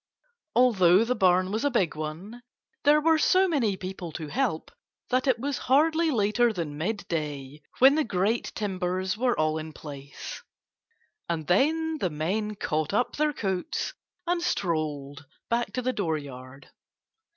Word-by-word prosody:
Although 200 -6 +5
the 250 - +1
barn 185 -3 +3
was 220 +4 -1
a 285 - +3
big 200 - +1
one 165 +10 -6 0.4
there 295 +1 +6
were 320 +1 +3
so 375 +3 +4
many 235 - +1
people 185 -2 -6
to 155 -1 -6
help 240 - -1 0.4
that 255 +2 +1
it 255 -3 +3
was 275 +2 -3
hardly 320 +4 +4
later 235 -1 +2
than 165 -7 -4
midday 150 -6 -4 0.2
when 265 +2 +7
the 310 +1 +2
great 210 +2 0
timbers 185 -2 -2
were 245 +2 +1
all 155 0 +1
in 155 0 -7
place. 140 -2 -9 0.9
And 165 -2 -2
then 315 - +2
the 185 - 0
men 195 +8 -2
caught 155 -2 -1
up 245 +2 0
their 305 0 +2
coats 195 - -3 0.3
and 350 0 0
strolled 155 - -2 0.3
back 235 +1 0
to 255 - -2
the 255 +1 0
dooryard. 140 - -5
200 Hz, 150 wpm, -27 LUFS, 160-255 Hz, 0.9 s, when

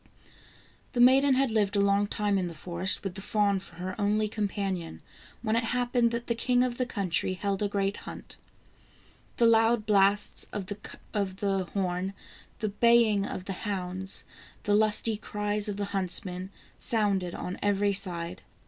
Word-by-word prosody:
The 245 - -2
maiden 265 +2 +6
had 265 -2 +2
lived 210 -2 +1
a - - +3
long 200 +1 +3
time 205 -1 0
in 180 - -1
the 170 - -8
forest 175 +4 +1
with 195 -3 -4
the 195 - -7
fawn 205 -1 +1
for 180 -2 -12
her 185 +2 -5
only 210 +1 +1
companion, 195 -5 -3 0.4
when 220 -1 +1
it 230 - +1
happened 245 0 +1
that 235 0 -4
the 235 - 0
king 245 +2 +2
of 250 -1 -2
the 250 - 0
country 185 -4 -1
held 195 +2 -2
a 205 - +2
great 200 0 -1
hunt. - - -10 1.0
The 235 - +4
loud 225 -1 +4
blasts 205 -1 +2
of 200 - -4
the 195 -1 -3
horn, 185 0 -1 0.4
the 215 - -2
baying 215 -1 +3
of 185 - -6
the 195 - -4
hounds, 190 -1 -2 0.4
the 205 - +1
lusty 215 +1 +2
cries 210 0 -1
of 200 - -4
the 205 - -2
hunts 190 +1 +3
men, 185 +1 -6 0.3
sounded 200 -6 +1
on 180 - -5
every 205 0 +1
side. 175 -3 0
205 Hz, 165 wpm, -28 LUFS, 190-220 Hz, 1.0 s, maiden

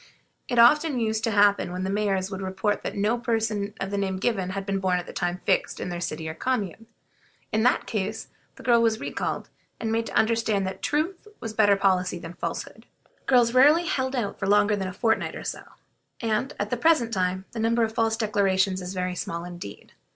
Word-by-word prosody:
It 245 - -2
often 285 +4 +5
used 220 -1 -1
to - - +1
happen 205 -3 +3
that 180 +1 -4
the 190 - -2
mayors 195 -2 0
would 190 0 -5
report 190 +2 -1
that - - -5
no 210 +4 +1
person 220 -3 -1
of 195 0 -3
the 200 - -1
name 190 -1 -1
given 190 -3 -1
had 195 +1 -4
been 195 -1 -1
born 185 -1 +1
at 175 - -4
the - - -10
time 175 0 -2
fixed - - +1
in - - -4
their 175 -1 -4
city 160 -2 -4
or 160 - -4
commune. 225 +1 -2 0.6
In 220 - +1
that 250 +2 +3
case 215 +1 -3 0.3
the - - -13
girl 235 -1 +4
was 225 -1 +2
recalled, - - -4 0.3
and 225 -1 -2
made 230 0 0
to - - -7
understand 220 -3 +2
that 190 +1 -5
truth 330 - -1
was 225 -1 -5
better 205 -2 +4
policy 185 -2 +1
than 170 0 -8
falsehood. - - -6 0.4
Girls 240 -3 +4
rarely 295 +7 +6
held 260 -4 -1
out 230 -5 -3
longer 205 +1 +3
than 190 -2 -3
a - - -4
fortnight 225 +3 0
or - - -7
so, - - -4 0.6
and, 230 +4 -1
at 205 +1 -2
the 245 - 0
present 240 -4 +3
time, 185 0 -1
the 230 - -6
number 230 +1 +2
of 220 0 -1
false 225 0 +1
declarations 195 -3 +1
is 180 +1 -6
very 180 0 -1
small 170 -1 -4
indeed. 175 - -9
205 Hz, 210 wpm, -25 LUFS, 190-230 Hz, 0.6 s, rarely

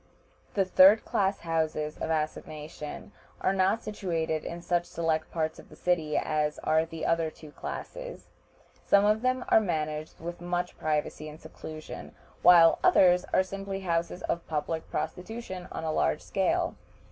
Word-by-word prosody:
The 195 -2 +3
third 190 +3 +7
class 195 0 0
houses 160 -2 -1
of - - -3
assignation 155 +1 -4 0.3
are 190 - +1
not 195 +4 +2
situated 165 -6 -2
in 170 - -5
such 175 0 +1
select 160 -2 -1
parts 160 -1 -2
of - - -14
the - - -13
city 165 -4 0
as 150 -1 0
are 160 +1 +3
the 160 -1 -5
other 165 -1 +2
two 155 -1 -13
classes. - - -7 0.6
Some 200 0 +5
of 215 +1 +3
them 255 0 0
are - - +7
managed 155 -5 -3
with 170 +1 -6
much 175 0 -2
privacy 155 0 -1
and 150 +1 -11
seclusion, 155 -1 -9 0.3
while 170 -2 +7
others 180 -1 +5
are 185 - +4
simply 195 +1 -5
houses 170 0 -1
of 170 - -2
public 160 +1 -3
prostitution 180 +4 -5
on - - -5
a 160 - -1
large 75 - +1
scale. - - 0
165 Hz, 155 wpm, -29 LUFS, 155-190 Hz, 0.6 s, third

